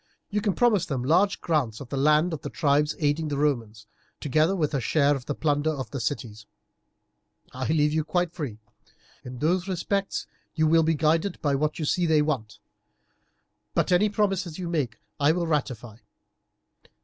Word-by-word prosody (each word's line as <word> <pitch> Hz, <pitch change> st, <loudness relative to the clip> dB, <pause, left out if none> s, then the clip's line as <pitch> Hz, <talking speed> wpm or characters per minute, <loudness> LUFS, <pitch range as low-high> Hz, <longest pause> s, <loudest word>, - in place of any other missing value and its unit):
You 210 Hz, +1 st, 0 dB
can 205 Hz, -2 st, +1 dB
promise 215 Hz, -7 st, +3 dB
them 130 Hz, -4 st, -2 dB
large 180 Hz, +9 st, +2 dB
grants 135 Hz, -10 st, 0 dB
of 135 Hz, -, -9 dB
the -, -, -3 dB
land 150 Hz, +5 st, +3 dB
of 150 Hz, -, -5 dB
the -, -, -5 dB
tribes 150 Hz, -1 st, +1 dB
aiding 150 Hz, +1 st, 0 dB
the 145 Hz, -1 st, -2 dB
Romans, 115 Hz, -7 st, -1 dB, 0.3 s
together 155 Hz, +6 st, +2 dB
with 155 Hz, -5 st, -1 dB
a 135 Hz, -, 0 dB
share 145 Hz, +4 st, +2 dB
in 135 Hz, -, -5 dB
the 145 Hz, -, -2 dB
plunder 145 Hz, 0 st, +1 dB
of 130 Hz, -7 st, -4 dB
the 140 Hz, -, -4 dB
cities. 110 Hz, -4 st, -4 dB, 1.1 s
I 130 Hz, 0 st, -3 dB
leave 150 Hz, -1 st, +2 dB
you 155 Hz, 0 st, +1 dB
quite 175 Hz, +1 st, -1 dB
free. 140 Hz, -, -5 dB, 0.7 s
In 125 Hz, 0 st, -8 dB
those 175 Hz, +7 st, 0 dB
respects 195 Hz, +2 st, -2 dB, 0.3 s
you 160 Hz, -1 st, +2 dB
will 165 Hz, +1 st, +5 dB
be 160 Hz, 0 st, +2 dB
guided 160 Hz, +5 st, +1 dB
by 145 Hz, -2 st, +2 dB
what 150 Hz, +2 st, 0 dB
you 155 Hz, -, -2 dB
see 175 Hz, +3 st, +1 dB
they 155 Hz, -2 st, +4 dB
want; 120 Hz, -9 st, -3 dB, 1.2 s
but -, -, +1 dB
any 205 Hz, +4 st, +4 dB
promises 195 Hz, -5 st, -1 dB
you 180 Hz, -2 st, -4 dB
may 170 Hz, -2 st, 0 dB
make 120 Hz, -6 st, -4 dB, 0.2 s
I 145 Hz, +2 st, +4 dB
will 175 Hz, 0 st, -1 dB
ratify. 125 Hz, -8 st, -2 dB
150 Hz, 185 wpm, -26 LUFS, 140-170 Hz, 1.2 s, will